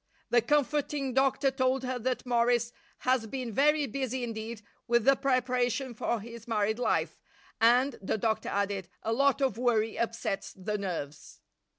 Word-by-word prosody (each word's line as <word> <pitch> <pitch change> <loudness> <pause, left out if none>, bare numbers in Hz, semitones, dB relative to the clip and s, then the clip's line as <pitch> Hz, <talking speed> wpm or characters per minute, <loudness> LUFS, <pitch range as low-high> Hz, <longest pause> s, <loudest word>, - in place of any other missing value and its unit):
The 240 - +5
comforting 285 +1 0
doctor 270 +1 +2
told 260 0 +1
her 255 -1 -2
that 255 +2 -2
Morris 240 -1 +2 0.3
has 255 -3 +1
been 250 0 -4
very 295 +4 +3
busy 260 0 -3
indeed 225 -1 -5 0.2
with 235 -1 +2
the 275 0 +6
preparation 255 -1 0
for 230 +1 -1
his 230 +2 -10
married 220 0 0
life 245 - 0 0.4
and, 245 +3 +4
the 195 - -1
doctor 220 +1 -1
added, 200 -2 -2
a 225 - 0
lot 275 +3 +2
of 265 -4 +1
worry 225 -3 +1
upsets 230 -4 -2
the 210 +2 -3
nerves. 155 -7 -6
240 Hz, 155 wpm, -29 LUFS, 220-260 Hz, 0.4 s, the